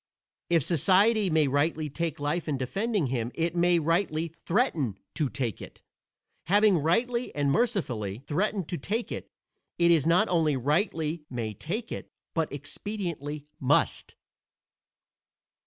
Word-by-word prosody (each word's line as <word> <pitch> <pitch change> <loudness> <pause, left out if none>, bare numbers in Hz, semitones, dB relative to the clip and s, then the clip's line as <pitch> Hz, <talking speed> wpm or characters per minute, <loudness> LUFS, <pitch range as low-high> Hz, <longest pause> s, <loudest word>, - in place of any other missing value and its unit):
If 165 -4 +3
society 195 - +3
may 155 -3 +3
rightly 150 +3 +1
take 160 +1 -3
life 150 +4 -1
in 145 -3 0
defending 195 - -1
him 120 -1 -1
it 170 +1 -1
may 175 0 +4
rightly 165 0 +1
threaten 165 - 0 0.2
to 150 -5 0
take 120 -6 -3
it. - - -11 0.6
Having 205 0 +4
rightly 235 - 0
and 145 -1 +1
mercifully 130 - -1
threatened 190 +2 -1
to 175 - -3
take 220 - -2
it, - - -5 0.5
it 170 -4 +4
not 180 +6 +4
only 160 -5 +2
rightly 155 - 0
may 115 -4 -3
take 215 - -5
it, - - -6 0.2
but 165 -2 0
expediently 150 -2 -5
must. 130 - +1
165 Hz, 130 wpm, -28 LUFS, 145-195 Hz, 0.6 s, may